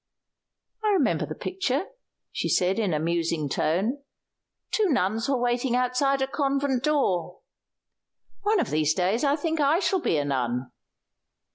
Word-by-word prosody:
"I 425 Hz, -1 st, +3 dB
remember 345 Hz, -9 st, +1 dB
the -, -, -6 dB
picture," 370 Hz, -4 st, -2 dB, 0.5 s
she -, -, -2 dB
said 185 Hz, +4 st, +2 dB
in 205 Hz, -5 st, 0 dB
a 155 Hz, -, +1 dB
musing 165 Hz, -1 st, -1 dB
tone. 195 Hz, -, 0 dB, 0.7 s
"Two 425 Hz, -3 st, +2 dB
nuns 225 Hz, -, 0 dB
were 275 Hz, -, +2 dB
waiting 245 Hz, +1 st, 0 dB
outside 255 Hz, +2 st, +1 dB
a -, -, -1 dB
convent 275 Hz, -2 st, 0 dB
door. 190 Hz, -, 0 dB, 1.0 s
One 415 Hz, 0 st, +2 dB
of -, -, -1 dB
these 155 Hz, 0 st, +2 dB
days 190 Hz, +7 st, +1 dB
I 285 Hz, 0 st, +3 dB
think 320 Hz, +1 st, -2 dB
I 295 Hz, +2 st, +4 dB
shall 380 Hz, -1 st, +1 dB
be 160 Hz, -, +1 dB
a 145 Hz, -, 0 dB
nun." 125 Hz, -2 st, -2 dB
250 Hz, 150 wpm, -26 LUFS, 175-285 Hz, 1.0 s, I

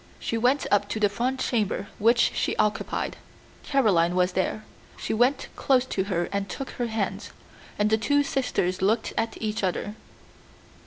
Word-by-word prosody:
She -, -, -3 dB
went 250 Hz, +5 st, +2 dB
up 205 Hz, 0 st, +3 dB
to 220 Hz, -, -2 dB
the 205 Hz, -1 st, +3 dB
front 245 Hz, +6 st, -2 dB
chamber 210 Hz, -5 st, -1 dB
which 235 Hz, +3 st, +4 dB
she -, -, -1 dB
occupied. 210 Hz, 0 st, -1 dB, 0.4 s
Caroline 195 Hz, -, +2 dB
was 180 Hz, 0 st, +2 dB
there. 190 Hz, +4 st, -2 dB, 0.3 s
She -, -, -3 dB
went 250 Hz, +5 st, +2 dB
close 260 Hz, -2 st, +2 dB
to 190 Hz, -6 st, -2 dB
her 175 Hz, -3 st, -1 dB
and 200 Hz, -1 st, -2 dB
took 270 Hz, +8 st, -5 dB
her 240 Hz, -, -3 dB
hands, 220 Hz, -3 st, -3 dB, 0.5 s
and 210 Hz, +1 st, +1 dB
the 220 Hz, -, +3 dB
two 285 Hz, +5 st, +2 dB
sisters 190 Hz, -10 st, -1 dB
looked 220 Hz, +4 st, +1 dB
at 225 Hz, -, -2 dB
each 215 Hz, -1 st, -2 dB
other. 190 Hz, +2 st, -1 dB
215 Hz, 165 wpm, -26 LUFS, 195-245 Hz, 0.5 s, which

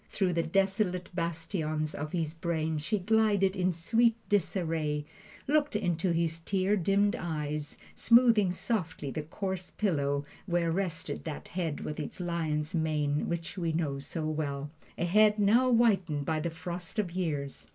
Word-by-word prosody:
Through 185 Hz, -3 st, 0 dB
the 170 Hz, -, +2 dB
desolate 190 Hz, +1 st, 0 dB
bastions 165 Hz, -2 st, -2 dB
of 150 Hz, +1 st, -5 dB
his 160 Hz, -3 st, -1 dB
brain 160 Hz, -2 st, -1 dB
she 165 Hz, +8 st, -1 dB
glided 205 Hz, -1 st, +2 dB
in 185 Hz, -1 st, +1 dB
sweet 225 Hz, +7 st, +2 dB
disarray, 165 Hz, -6 st, 0 dB, 0.4 s
looked 295 Hz, -2 st, +2 dB
into 180 Hz, -3 st, +1 dB
his 165 Hz, -1 st, 0 dB
tear 190 Hz, +4 st, +1 dB
dimmed 200 Hz, +2 st, +2 dB
eyes, 150 Hz, -2 st, -3 dB, 0.2 s
smoothing 230 Hz, -5 st, +5 dB
softly 180 Hz, -, -2 dB
the 155 Hz, -, -3 dB
coarse 185 Hz, +3 st, -4 dB
pillow 145 Hz, -8 st, 0 dB, 0.2 s
where 170 Hz, -2 st, +1 dB
rested 165 Hz, -2 st, -2 dB
that 155 Hz, -3 st, -6 dB
head 165 Hz, -4 st, -2 dB
with 150 Hz, -, -5 dB
its 150 Hz, -, -5 dB
lion's 160 Hz, -4 st, -1 dB
mane 150 Hz, -3 st, 0 dB
which 170 Hz, +3 st, -3 dB
we 165 Hz, -2 st, 0 dB
know 150 Hz, -4 st, -1 dB
so 155 Hz, +3 st, -3 dB
well 145 Hz, -2 st, -2 dB, 0.3 s
a -, -, 0 dB
head 210 Hz, +4 st, +5 dB
now 230 Hz, +5 st, +4 dB
whitened 195 Hz, -11 st, +3 dB
by 160 Hz, -1 st, 0 dB
the 170 Hz, +2 st, -1 dB
frost 175 Hz, +3 st, -6 dB
of 200 Hz, -5 st, 0 dB
years. 150 Hz, -6 st, -3 dB
170 Hz, 150 wpm, -30 LUFS, 155-195 Hz, 0.4 s, smoothing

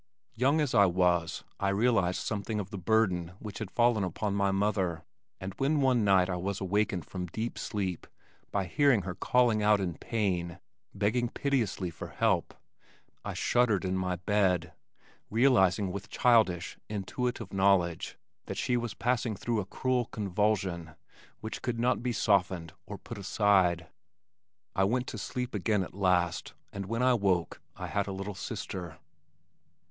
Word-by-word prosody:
Young 135 Hz, +6 st, +2 dB
as 145 Hz, -4 st, 0 dB
I 100 Hz, -4 st, +6 dB
was 90 Hz, 0 st, +1 dB, 0.2 s
I 100 Hz, -, +1 dB
realized 100 Hz, -3 st, +2 dB
something 105 Hz, 0 st, -2 dB
of 100 Hz, -2 st, -5 dB
the 100 Hz, -, -5 dB
burden 90 Hz, -4 st, +1 dB
which 105 Hz, -1 st, -8 dB
had 110 Hz, -4 st, -4 dB
fallen 120 Hz, -3 st, +2 dB
upon 100 Hz, +3 st, -2 dB
my 100 Hz, 0 st, +2 dB
mother, 95 Hz, -4 st, 0 dB, 0.4 s
and 95 Hz, +1 st, -5 dB
when 145 Hz, +3 st, +2 dB
one 130 Hz, -4 st, +3 dB
night 95 Hz, -3 st, +4 dB
I 90 Hz, -2 st, -2 dB
was 95 Hz, +2 st, -3 dB
awakened 95 Hz, -2 st, 0 dB
from 90 Hz, -1 st, -5 dB
deep 110 Hz, +7 st, -4 dB
sleep 95 Hz, -5 st, -3 dB, 0.4 s
by 100 Hz, -2 st, 0 dB
hearing 130 Hz, +1 st, +3 dB
her 90 Hz, +1 st, -4 dB
calling 120 Hz, +1 st, +2 dB
out 105 Hz, 0 st, +4 dB
in 90 Hz, -3 st, -2 dB
pain, 90 Hz, -4 st, -2 dB, 0.4 s
begging 110 Hz, +4 st, +1 dB
piteously 115 Hz, -11 st, -1 dB
for 80 Hz, -, -8 dB
help, -, -, 0 dB, 0.7 s
I -, -, -5 dB
shuddered 115 Hz, -6 st, +2 dB
in 95 Hz, 0 st, 0 dB
my 90 Hz, -1 st, -1 dB
bed, 90 Hz, -3 st, +1 dB, 0.6 s
realizing 105 Hz, -5 st, +3 dB
with 100 Hz, +3 st, -6 dB
childish, 110 Hz, -8 st, +2 dB
intuitive 110 Hz, +2 st, -3 dB
knowledge 95 Hz, -4 st, +2 dB, 0.3 s
that -, -, -5 dB
she 125 Hz, -, +1 dB
was 120 Hz, -3 st, -3 dB
passing 120 Hz, -2 st, 0 dB
through 115 Hz, +3 st, -1 dB
a 95 Hz, -, -4 dB
cruel 125 Hz, +2 st, 0 dB
convulsion 95 Hz, -6 st, -1 dB, 0.5 s
which 110 Hz, -, -5 dB
could 120 Hz, -2 st, -2 dB
not 125 Hz, +1 st, +2 dB
be 125 Hz, 0 st, -1 dB
softened 95 Hz, -7 st, +1 dB
or 105 Hz, -, -6 dB
put 110 Hz, +3 st, -9 dB
aside. 95 Hz, -4 st, +2 dB, 0.9 s
I 95 Hz, -, +3 dB
went 125 Hz, +6 st, +1 dB
to 110 Hz, -, -6 dB
sleep 125 Hz, +5 st, -4 dB
again 105 Hz, 0 st, +1 dB
at -, -, -9 dB
last, 90 Hz, -3 st, 0 dB, 0.2 s
and 100 Hz, -1 st, -5 dB
when 115 Hz, +4 st, -1 dB
I 130 Hz, 0 st, +5 dB
woke, 95 Hz, -6 st, 0 dB
I -, -, -6 dB
had 100 Hz, -1 st, -1 dB
a -, -, -3 dB
little 100 Hz, +2 st, -5 dB
sister. 95 Hz, -5 st, -6 dB
100 Hz, 160 wpm, -30 LUFS, 90-115 Hz, 0.9 s, I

